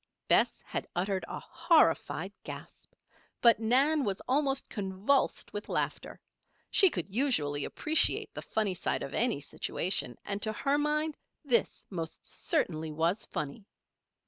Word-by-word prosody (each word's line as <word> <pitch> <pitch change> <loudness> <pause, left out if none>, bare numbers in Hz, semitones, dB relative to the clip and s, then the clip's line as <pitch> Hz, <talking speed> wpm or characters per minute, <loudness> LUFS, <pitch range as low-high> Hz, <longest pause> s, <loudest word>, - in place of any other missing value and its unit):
Bess - - +3
had - - -4
uttered 190 +2 -1
a - - -5
horrified 330 -2 +2
gasp; - - -10 0.5
but 235 -3 +6
Nan 270 +7 +3
was 200 -4 -1
almost 270 0 +1
convulsed 205 +7 0
with 205 - -5
laughter. - - -3 0.5
She 385 - +7
could 180 - -4
usually 190 - 0
appreciate 315 0 +3
the - - -6
funny 215 -3 0
side 180 - -2
of 140 - -6
any 235 - +2
situation; 145 - -2
and 200 0 -3
to 215 +1 0
her 280 +6 +1
mind 300 +1 0 0.3
this 240 -5 +1
most 165 -3 -6
certainly 160 - -2
was 165 +7 0
funny! 150 +7 -5
215 Hz, 135 wpm, -30 LUFS, 180-280 Hz, 0.5 s, She